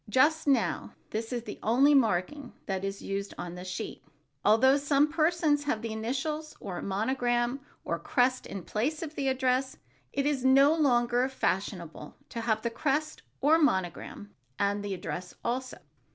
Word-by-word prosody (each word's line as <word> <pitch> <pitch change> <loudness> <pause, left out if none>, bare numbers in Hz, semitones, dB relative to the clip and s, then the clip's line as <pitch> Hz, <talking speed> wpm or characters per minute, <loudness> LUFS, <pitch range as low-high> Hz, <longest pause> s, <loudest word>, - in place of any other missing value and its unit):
Just 295 +8 +3
now, 270 -5 +1 0.2
this 225 +2 -3
is 240 -2 -2
the 210 - -8
only 265 +7 +4
marking 250 +2 +1
that 190 -1 -2
is 195 0 -4
used 195 0 -4
on 175 -1 -5
the 180 0 -8
sheet, 185 0 -6 0.4
although 250 +6 +5
some 285 +1 +2
persons 310 -2 +2
have 230 -6 -1
the 225 -1 -3
initials 275 +8 -3
or 185 -4 -5
monogram, 240 +4 0 0.3
or - - -2
crest, 255 -3 +1
in 195 -3 -6
place 280 - -2
of 315 -2 -6
the 275 -3 -2
address. 260 0 +1 0.3
It 275 - -1
is 285 -3 0
no 275 +3 +6
longer 245 -4 +2
fashionable 180 - -3
to 230 - -4
have 220 -1 0
the 235 - -1
crest 295 +5 -1 0.2
or 310 +4 +5
monogram 190 - -1 0.2
and 205 0 0
the 200 -1 -3
address 180 0 -6
also. 255 +2 -2
250 Hz, 160 wpm, -29 LUFS, 205-280 Hz, 0.4 s, no